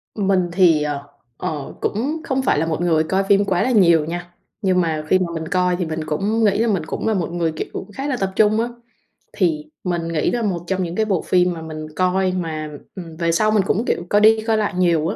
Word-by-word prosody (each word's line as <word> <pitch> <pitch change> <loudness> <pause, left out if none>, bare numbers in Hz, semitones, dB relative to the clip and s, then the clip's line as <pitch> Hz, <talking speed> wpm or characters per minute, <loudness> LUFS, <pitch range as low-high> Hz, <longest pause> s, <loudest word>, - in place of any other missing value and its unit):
Mình 190 -4 +1
thì, 170 -5 +4
ờ, 145 -1 -4 0.3
ờ, 150 -3 -4
cũng 285 +10 -2
không 265 -2 -1
phải 260 - +2
là 160 - +1
một 165 +1 -2
người 160 -3 +2
coi 190 +5 0
phim 200 +1 +3
quá 185 -3 +1
là 255 - +1
nhiều 170 -8 +5
nha, 175 +2 -6 0.3
nhưng 185 -3 +2
mà 160 -3 -1
khi 185 - +4
mà 180 -2 -2
mình 160 -1 -4
coi 180 0 +1
thì 175 0 -2
mình 160 0 -4
cũng 205 +9 0
nghĩ 200 -2 +3
là 230 - +2
mình 195 -7 0
cũng 160 - -4
là 220 - +2
một 180 -5 -2
người, 170 -2 0
kiểu, 155 - -5
cũng 195 - -7
khá 270 +7 -5
là 270 -3 -1
tập 195 -1 -1
trung 215 +1 +3
á. 235 - -1 0.7
Thì 160 -5 0 0.2
mình 175 -2 -2
nghĩ 165 -2 0
là 240 - -1
một 195 -6 -1
trong 190 0 0
những 170 0 -4
cái 220 - +1
bộ 195 -5 0
phim 180 0 +2
mà 165 - -8
mình 155 -1 -7
coi 185 0 +1
mà, 160 -4 -3 0.3
ừm, 170 -4 -8
về 170 0 +1
sau 215 +6 +2
mình 210 -2 +3
cũng, 220 +4 0
kiểu, 175 - -1
coi 205 - +3
đi, 220 +1 +6
coi 220 -1 +3
lại 210 -2 0
nhiều 170 -3 +2
á, 200 - -2
180 Hz, 255 wpm, -20 LUFS, 165-205 Hz, 0.7 s, đi